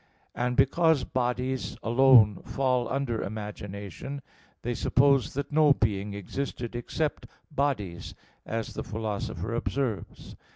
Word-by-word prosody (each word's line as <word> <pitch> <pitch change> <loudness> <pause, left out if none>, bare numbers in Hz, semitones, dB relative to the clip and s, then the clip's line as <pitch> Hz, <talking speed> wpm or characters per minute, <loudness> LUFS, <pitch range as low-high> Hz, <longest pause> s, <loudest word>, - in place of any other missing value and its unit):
And 125 0 -1
because 160 -1 +4
bodies 125 +1 -2
alone 120 -4 +6
fall 130 -2 0
under 130 -4 -1
imagination, 105 +5 -6 0.4
they 120 - -1
supposed 135 +2 +3
that 140 +1 -3
no 150 -1 +6
being 105 -4 -1
existed 120 +3 -4
except 145 +5 -2 0.2
bodies, 130 - -2 0.3
as 115 0 -4
the - - -4
Philosopher 110 +1 -3
observes 120 -4 -3
(Phys. - - -14
125 Hz, 115 wpm, -28 LUFS, 105-135 Hz, 0.4 s, alone